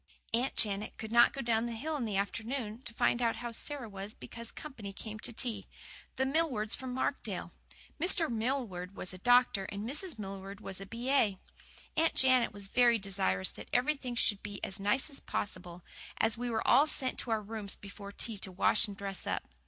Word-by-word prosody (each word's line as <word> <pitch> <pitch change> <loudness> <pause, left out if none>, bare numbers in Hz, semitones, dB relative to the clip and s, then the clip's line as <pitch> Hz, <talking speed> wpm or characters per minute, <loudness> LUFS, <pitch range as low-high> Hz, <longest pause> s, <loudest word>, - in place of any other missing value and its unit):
Aunt 245 +4 +1
Janet 205 -1 +2
could 220 0 -6
not 235 0 +7
go 275 - -4
down 230 -1 +1
the 235 - -3
hill 310 +7 -2
in 265 -5 -1
the 205 -3 -1
afternoon 225 +3 -2
to 235 - -2
find 240 - +2
out 230 -1 +2
how 240 -1 -5
Sara 270 +1 -2
was 200 +1 -7
because 235 0 -7
company 235 -10 -8
came 215 +2 -7
to - - -4
tea 235 0 -2 0.5
the 265 - +1
Millwards 265 -7 +1
from 260 -1 -4
Markdale. 255 - -2 0.5
Mr. 345 0 +3
Millward 220 -6 -2
was 180 - -1
a 185 - -8
doctor, 245 -3 +4
and 200 +3 -5
Mrs. 305 +3 -1
Millward 195 -1 -6
was 195 -2 -6
a 195 - -7
B.A. 235 -2 +2 0.6
Aunt 325 +1 +3
Janet 255 -2 +5
was 205 -2 -7
very 240 +2 +5
desirous 95 - 0
that - - -11
everything 255 -1 +1
should 205 -3 +2
be 205 -1 -6
as 190 - -2
nice 205 +7 +2
as 275 - -6
possible, 180 -3 -4 0.3
and 225 0 +3
we 245 +1 -3
were 225 -1 -1
all 290 +3 +7
sent 260 -4 -1
to - - -3
our 220 -1 +1
rooms 210 -1 -5
before 200 0 -9
tea 215 0 -2
to 190 - -1
wash 205 +4 +4
and 200 -1 -8
dress 195 -1 -1
up. - - -1
225 Hz, 200 wpm, -32 LUFS, 200-250 Hz, 0.6 s, not